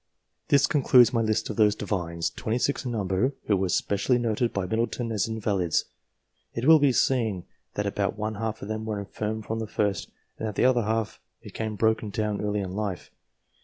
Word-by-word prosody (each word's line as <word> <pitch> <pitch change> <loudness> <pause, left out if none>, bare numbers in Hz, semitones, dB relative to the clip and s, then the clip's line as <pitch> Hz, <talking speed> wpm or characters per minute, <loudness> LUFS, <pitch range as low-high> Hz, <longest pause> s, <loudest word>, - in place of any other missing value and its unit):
This 140 0 +5
concludes 125 -5 +5
my 115 - +2
list 110 0 0
of 105 - -7
those 105 -1 +4
Divines, 85 -6 -2
26 125 +5 -1
in 125 - -2
number, 105 +5 0
who 105 - +3
were 95 -1 0
specially 105 +7 +1
noted 120 0 0
by 100 -2 -2
Middleton 115 +3 -1
as 105 -3 0
invalids. 100 -7 0 0.7
It 115 - -2
will 160 +1 +8
be 140 -2 +4
seen 110 -5 +1 0.3
that 105 - -1
about 100 0 -1
one 110 +1 -2
half 110 +1 -4
of - - -6
them 110 0 -3
were 110 -1 -3
infirm 105 +2 -4
from 110 +1 -3
the 110 - -3
first, 100 -3 -1 0.3
and 110 - -2
that 105 - -5
the - - +2
other 125 -3 +3
half 110 0 -1 0.2
became 110 -1 -4
broken 110 0 +1
down 105 0 -2
early 105 0 -1
in 95 -2 -4
life. 100 -2 -4
110 Hz, 195 wpm, -26 LUFS, 100-115 Hz, 0.7 s, will